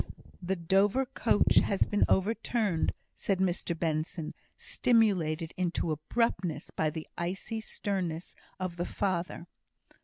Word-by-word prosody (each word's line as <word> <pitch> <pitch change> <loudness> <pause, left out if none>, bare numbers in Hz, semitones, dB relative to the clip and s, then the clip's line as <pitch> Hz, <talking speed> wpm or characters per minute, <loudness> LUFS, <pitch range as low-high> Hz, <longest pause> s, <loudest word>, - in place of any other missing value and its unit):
"The 185 +2 0
Dover 195 +9 +3
coach 240 -4 +2
has 195 - +4
been 205 - +2
overturned," 210 -3 +1 0.2
said 195 - 0
Mr 175 -2 0
Benson, 160 0 -2 0.2
stimulated 185 - +2
into 175 -2 0
abruptness 165 0 -1
by 155 - +1
the 155 +1 -6
icy 195 +6 -3
sternness 185 -6 -3 0.2
of 185 -2 -3
the 175 - -1
father. 180 -3 -2
185 Hz, 115 wpm, -30 LUFS, 165-205 Hz, 0.2 s, has